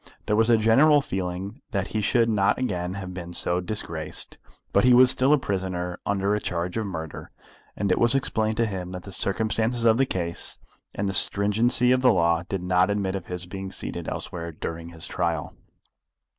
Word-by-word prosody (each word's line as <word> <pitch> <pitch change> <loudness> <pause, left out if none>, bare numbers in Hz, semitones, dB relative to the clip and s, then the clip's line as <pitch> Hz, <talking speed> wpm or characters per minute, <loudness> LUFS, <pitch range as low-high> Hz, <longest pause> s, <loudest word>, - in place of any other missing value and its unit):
There 105 - +1
was 115 +2 +3
a 115 - +5
general 135 +8 +5
feeling 95 +3 -5
that 100 -2 -2
he 110 - -2
should 115 +2 +2
not 100 -3 +2
again 90 -7 -3
have 95 -2 -7
been 85 -1 -8
so 85 +1 +1
disgraced; 85 -6 -4 0.3
but 100 - +4
he 125 0 +6
was 125 +1 +10
still 130 +2 +4
a 150 - +6
prisoner 90 -6 -3
under 100 0 0
a 105 - 0
charge 90 -2 -3
of 110 -2 -2
murder, 80 -5 -7 0.5
and 100 -2 -1
it - - +2
was 120 +3 +3
explained 110 -5 0
to 115 - +2
him 95 -3 -5
that 90 -1 -7
the 100 - -10
circumstances 110 +5 0
of 115 0 +5
the 135 - +3
case 85 -5 -2 0.4
and 100 - -2
the 95 - -2
stringency 115 +6 +2
of 130 0 +3
the 125 -1 +5
law 85 -4 +2
did 95 -2 -3
not 90 +1 +2
admit 100 -2 -1
of 95 - -6
his 90 -1 -5
being 95 +1 -7
seated - - -3
elsewhere 85 -1 -6
during 85 +1 -6
his 85 -1 -8
trial. 85 -5 -2
100 Hz, 200 wpm, -25 LUFS, 90-115 Hz, 0.5 s, was